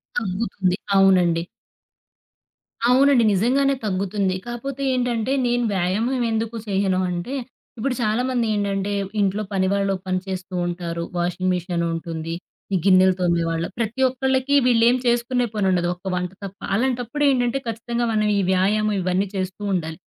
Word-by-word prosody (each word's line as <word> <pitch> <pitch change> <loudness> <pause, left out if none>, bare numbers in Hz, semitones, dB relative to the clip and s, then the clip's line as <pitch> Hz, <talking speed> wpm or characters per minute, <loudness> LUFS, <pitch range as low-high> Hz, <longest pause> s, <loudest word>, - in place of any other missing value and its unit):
తగ్గుతుంది. 190 -3 -1 0.2
అవునండి. 180 -3 +4 1.5
అవునండి. 260 -1 +5
నిజంగానే 270 +8 +2
తగ్గుతుంది. 195 -1 -1
కాపోతే 260 +3 -5
ఏంటంటే 245 -1 0
నేను 245 0 +1
వ్యాయామం 220 +8 0
ఎందుకు 225 +1 -2
చేయను 190 -1 +1
అంటే, 175 +9 -4 0.4
ఇప్పుడు 250 +3 -1
చాలా 215 +1 +1
మంది 245 -2 0
ఏంటంటే 200 -1 -1 0.3
ఇంట్లో 200 +1 +1
పనివాళ్ళు 195 +1 +1
పనిచేస్తూ 185 0 -3
ఉంటారు. 170 -1 -4
వాషింగ్ 180 +1 -1
మిషనుంటుంది, 165 -2 -3 0.4
ఈ - - +4
గిన్నెలు 185 -1 +6
తోమ్మేవాళ్ళు 170 -2 0
ప్రతి 235 +3 -2
ఒక్కళ్ళకి 265 +2 0
వీళ్ళేం 240 0 +4
చేసుకునే 240 +1 +1
పనుండదు. 185 -4 +1
ఒక 185 +2 -6
వంట 180 0 -2
తప్ప, 195 0 -8 0.2
అలాంటప్పుడు 250 +4 -1
ఏంటంటే 245 -1 +1
ఖచ్చితంగా 235 +1 -2
మనం 215 -1 +2
ఈ - - +2
వ్యాయామం 210 +3 +2
ఇవన్నీ 185 +2 0
చేస్తూ 190 +1 -4
ఉండాలి. 160 -3 -2
200 Hz, 125 wpm, -22 LUFS, 185-240 Hz, 1.5 s, గిన్నెలు